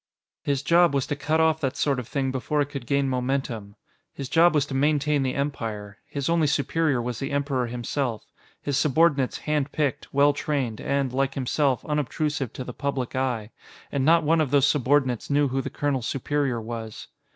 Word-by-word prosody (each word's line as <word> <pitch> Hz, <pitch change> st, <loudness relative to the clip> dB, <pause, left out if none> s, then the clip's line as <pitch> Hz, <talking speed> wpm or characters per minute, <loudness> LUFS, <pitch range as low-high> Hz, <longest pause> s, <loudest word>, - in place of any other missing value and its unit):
His 140 Hz, -1 st, -1 dB
job 170 Hz, +1 st, +4 dB
was 135 Hz, -1 st, +1 dB
to 145 Hz, -, -2 dB
cut 155 Hz, +3 st, 0 dB
off 160 Hz, 0 st, +3 dB
that 135 Hz, -2 st, -1 dB
sort 140 Hz, -3 st, +1 dB
of 120 Hz, -, -6 dB
thing 135 Hz, -2 st, -1 dB
before 135 Hz, +3 st, -1 dB
it 145 Hz, -1 st, +1 dB
could 140 Hz, -5 st, -7 dB
gain 140 Hz, -1 st, +2 dB
momentum. 125 Hz, -5 st, -2 dB, 0.4 s
His 135 Hz, -2 st, -7 dB
job 170 Hz, 0 st, +5 dB
was 145 Hz, -1 st, +3 dB
to 140 Hz, -, -7 dB
maintain 145 Hz, +1 st, +2 dB
the 130 Hz, -1 st, -1 dB
Empire; 110 Hz, -8 st, -4 dB
his 140 Hz, -2 st, -3 dB
only 165 Hz, -2 st, +3 dB
superior 150 Hz, -1 st, +1 dB
was 120 Hz, -1 st, -3 dB
the 135 Hz, -, -3 dB
Emperor 140 Hz, -3 st, 0 dB
himself; 120 Hz, 0 st, -3 dB, 0.3 s
his 145 Hz, -1 st, -1 dB
subordinates 145 Hz, -2 st, +2 dB
hand 150 Hz, -2 st, -1 dB
picked, 145 Hz, -4 st, -2 dB
well 140 Hz, +1 st, +4 dB
trained, 135 Hz, -7 st, -2 dB
and, 140 Hz, -2 st, -1 dB
like 135 Hz, +1 st, 0 dB
himself, 135 Hz, 0 st, 0 dB
unobtrusive 150 Hz, -2 st, -1 dB
to 130 Hz, -, -5 dB
the 125 Hz, -, -7 dB
public 135 Hz, -3 st, -3 dB
eye. 120 Hz, -4 st, -1 dB, 0.4 s
And 140 Hz, -2 st, 0 dB
not 165 Hz, +3 st, +5 dB
one 160 Hz, +2 st, +3 dB
of 150 Hz, -, 0 dB
those 140 Hz, 0 st, +4 dB
subordinates 135 Hz, -4 st, +1 dB
knew 145 Hz, -1 st, +3 dB
who 135 Hz, +1 st, -1 dB
the -, -, -5 dB
colonel's 135 Hz, -5 st, -1 dB
superior 135 Hz, -2 st, -1 dB
was. 115 Hz, -1 st, -7 dB
140 Hz, 190 wpm, -25 LUFS, 125-145 Hz, 0.4 s, job